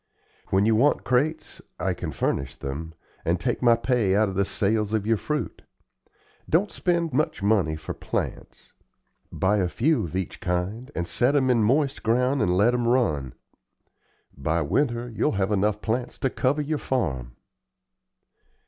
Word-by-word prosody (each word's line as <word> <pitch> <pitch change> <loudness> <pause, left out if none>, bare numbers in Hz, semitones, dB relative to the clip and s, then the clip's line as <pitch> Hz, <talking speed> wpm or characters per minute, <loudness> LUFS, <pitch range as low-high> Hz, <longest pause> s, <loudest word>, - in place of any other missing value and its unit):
When 95 +2 +2
you 110 0 +4
want 140 +7 +3
crates, 150 +6 -1 0.2
I - - 0
can - - -5
furnish 65 -1 -2
them, 80 +4 -6 0.3
and 85 +2 0
take 120 - -1
my 120 -2 +6
pay 115 -5 +1
out 105 0 +3
of - - -5
the 100 +1 +1
sales 105 +1 0
of 110 -2 0
your 115 +1 +3
fruit. 150 +7 -3 0.9
Don't 190 +6 +2
spend 170 -2 0
much 130 -7 0
money 100 -7 +2
for 80 - -6
plants. - - -5 0.6
Buy 100 +3 +1
a 90 -3 +1
few 140 - +1
of 85 - -7
each 95 -1 -3
kind, 95 +8 -2
and 85 - -1
set 125 +9 +1
'em 130 -2 +3
in 120 -2 +3
moist 140 +5 +1
ground 125 +4 +1
and 90 -3 +2
let 110 +5 +4
'em 120 -1 0
run. 75 - +1 1.0
By 80 +4 0
winter 120 - 0
you'll 115 -2 0
have 100 0 0
enough 105 +1 +1
plants 120 +2 -2
to 130 - +2
cover 145 +3 0
your 150 0 -2
farm." 65 - -2
110 Hz, 165 wpm, -25 LUFS, 95-130 Hz, 1.0 s, my